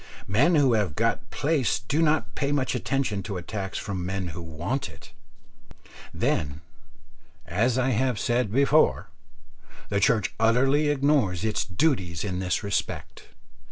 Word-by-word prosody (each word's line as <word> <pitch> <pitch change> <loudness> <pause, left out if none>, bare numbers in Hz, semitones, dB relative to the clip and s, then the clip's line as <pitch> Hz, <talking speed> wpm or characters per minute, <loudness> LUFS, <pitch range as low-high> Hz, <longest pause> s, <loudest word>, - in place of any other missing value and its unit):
Men 135 - +3
who 140 -5 +4
have 100 -9 0
got - - 0
place 145 -6 0
do 125 +9 -1
not 150 -9 +1
pay 140 +3 -1
much 140 -3 0
attention 125 -5 -1
to 100 -1 -5
attacks 95 +2 -5
from 100 -3 -4
men 95 0 -3
who 85 +1 -7
want 85 - -3
it. - - -15 1.0
Then, 70 +1 -1 0.8
as 115 +7 +1
I 130 0 +2 0.2
said 120 0 0
before, 140 - +3 0.8
the 100 - +1
Church 110 +1 +2
utterly 135 +6 +3
ignores 135 - +1
its 110 +2 0
duties 95 - 0
in 90 -3 -3
this 90 -1 -1
respect. 100 0 -3
110 Hz, 135 wpm, -26 LUFS, 95-135 Hz, 1.0 s, who